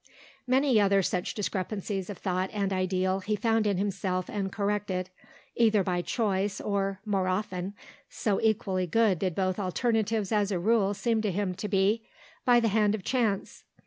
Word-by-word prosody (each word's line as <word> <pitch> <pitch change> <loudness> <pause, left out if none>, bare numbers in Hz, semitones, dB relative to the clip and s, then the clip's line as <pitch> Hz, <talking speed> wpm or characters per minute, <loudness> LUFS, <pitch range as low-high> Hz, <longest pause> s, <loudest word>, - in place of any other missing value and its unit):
Many 255 -3 +4
other 195 -1 +3
such 180 0 -2
discrepancies 195 0 -3
of 200 - -6
thought 185 0 -1
and 200 -2 -1
ideal 185 0 0
he 210 +3 -1
found 225 +1 +1
in 200 -3 +1
himself 190 -2 -2
and 195 -2 -2
corrected, 200 -3 -2 0.4
either 220 -4 +4
by 180 -1 0
choice 195 +2 -1
or, 195 -1 -1
more 195 -3 0
often 185 0 -2 0.3
(so 205 -3 -1
equally 190 -4 +1
good 210 -1 +2
did 185 -4 -1
both 185 0 0
alternatives 215 +1 0
as 205 -2 +1
a 190 - +1
rule 205 +1 +2
seem 225 +1 0
to 210 -2 0
him 190 0 -1
to 210 - -5
be) 205 +3 +2 0.4
by 245 -1 +6
the 230 -1 +2
hand 210 0 +2
of 205 - -7
chance. 225 -6 -1
200 Hz, 170 wpm, -28 LUFS, 185-215 Hz, 0.4 s, by